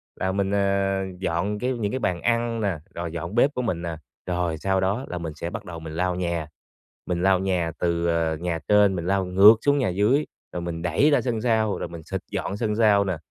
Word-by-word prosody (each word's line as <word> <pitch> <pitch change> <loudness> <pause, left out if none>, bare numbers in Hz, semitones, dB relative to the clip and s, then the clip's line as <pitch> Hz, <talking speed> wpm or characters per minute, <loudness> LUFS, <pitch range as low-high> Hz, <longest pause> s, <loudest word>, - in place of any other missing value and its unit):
là 95 0 -1
mình, 100 0 -1
à, 100 -1 +1
dọn 95 +4 -1
cái 130 +1 0
những 105 -4 -2
cái 130 - -2
bàn 90 -6 -1
ăn 115 -1 0
nè, 100 -5 0 0.2
rồi 85 -1 -4
dọn 85 +4 -5
bếp 140 +4 +4
của 125 - -2
mình 90 -8 -2
nè, 85 -1 -4 0.3
rồi 90 -2 -1
sau 95 +3 0
đó 100 +8 0
là 90 - -4
mình 80 -3 -5
sẽ 85 +2 -4
bắt - - -7
đầu 85 -2 -7
mình 80 -1 -8
lau 90 +2 0
nhà, 85 -3 -2 0.6
mình 90 -1 -1
lau 95 0 +4
nhà 90 -4 0
từ, 85 -1 0
à, 80 -1 +1
nhà 85 -2 -1
trên 105 -2 +5
mình 85 0 -4
lau 95 0 +1
ngược 100 +4 +8
xuống 145 0 +3
nhà 130 - +1
dưới, 105 +11 +2 0.3
rồi 90 - -3
mình 85 -1 -4
đẩy 90 - +3
ra 145 - +4
sân 115 -4 -2
sau, 110 -3 +1
rồi - - -4
mình 85 -1 -9
xịt - - -4
dọn 100 - -3
sân 105 -1 -1
sau 105 -3 +4
nè. 95 -2 -1
95 Hz, 240 wpm, -24 LUFS, 85-105 Hz, 0.6 s, ngược